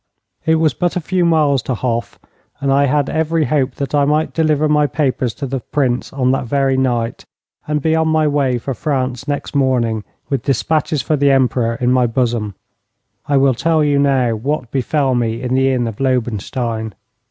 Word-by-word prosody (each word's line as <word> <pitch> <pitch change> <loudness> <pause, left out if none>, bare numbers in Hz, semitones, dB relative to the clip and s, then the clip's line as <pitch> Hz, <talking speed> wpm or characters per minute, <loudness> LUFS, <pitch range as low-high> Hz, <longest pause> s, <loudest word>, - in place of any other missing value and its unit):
It 160 - +4
was 160 -3 +2
but 175 +7 -1
a - - +1
few 180 +2 -1
miles 150 -5 +3
to 130 - -3
Hof, 120 0 -3 0.4
and 135 -1 +1
I 140 +1 +4
had 140 0 +1
every 160 0 0
hope 140 -4 0
that 140 -1 -4
I 145 -1 +3
might 150 +2 +1
deliver 155 -2 +2
my 150 -1 +3
papers 130 -4 -1
to 140 - -5
the 135 0 -3
Prince 125 -1 -1
on 130 -2 +1
that 135 0 -1
very 135 +2 +1
night, 120 -3 -1 0.4
and 150 -1 -1
be 160 0 +2
on 160 0 +1
my 155 -1 +2
way 140 -4 +1
for 135 +3 -4
France 130 -2 -2
next 145 -1 -3
morning 120 -5 +1 0.2
with 135 -4 -1
despatches 150 +3 0
for 155 - +1
the 140 0 +3
Emperor 125 -3 +2
in 125 +1 0
my 125 -1 +3
bosom. 115 -4 -1 0.7
I 145 - +2
will 135 -1 +4
tell 160 +5 +1
you 145 -1 +2
now 135 -4 +2
what 125 +1 -3
befell 135 +1 0
me 115 -2 -1
in 125 0 -2
the 135 +1 +3
inn 125 -2 0
of 110 -3 -6
Lobenstein. 115 -3 -2
135 Hz, 195 wpm, -17 LUFS, 125-150 Hz, 0.7 s, It